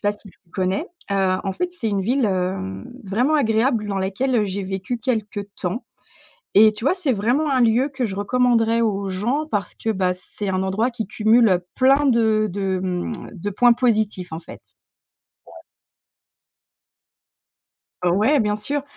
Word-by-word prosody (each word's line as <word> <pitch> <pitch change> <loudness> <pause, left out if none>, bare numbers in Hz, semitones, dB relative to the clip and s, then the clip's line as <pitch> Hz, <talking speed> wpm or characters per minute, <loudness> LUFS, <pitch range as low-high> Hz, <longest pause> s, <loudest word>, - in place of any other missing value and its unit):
pas 205 - +2
si 205 0 -15
tu - - -20
connais? 190 - -1 0.3
Heu, 190 -1 +2
en 195 - -1
fait, 355 - -2
c'est 335 -10 -5
une 200 -2 0
ville, 250 +6 +1
hem, 180 - -2
vraiment 240 +10 +1
agréable 225 -3 +1
dans 195 -1 -2
laquelle, 200 +8 -1
heu, 215 - +2
j'ai 195 0 -4
vécu 195 +5 -4
quelques 215 -3 -2
temps 185 +7 -3 0.7
et 215 +1 +8
tu 215 +3 -7
vois? 280 - +4
C'est 350 -8 0
vraiment 245 +9 +1
un 260 -2 +3
lieu 240 +4 +3
que 270 -3 -2
je 195 -4 -4
recommanderais 230 +2 +2
aux 200 -3 -1
gens 235 +11 -1
parce 205 -8 -2
que, 225 - -4
bah, 185 -3 0
c'est 195 +2 -6
un 185 0 0
endroit 210 +6 0
qui 235 -3 -5
cumule, 220 +2 +4
heu, 180 -1 +1
plein 270 +3 +4
de 220 -3 +3
de, 190 -1 -1
mmh, 180 +4 -2 0.2
de 200 +2 -4
points 240 +4 +5
positifs, 215 -7 0
en 160 - -5
fait. 165 - -12 0.9
Ouais. - - -16 2.5
Ouais, 205 +11 +3
bien 210 -4 +1
sûr, 280 +7 -3
215 Hz, 170 wpm, -22 LUFS, 190-245 Hz, 2.5 s, et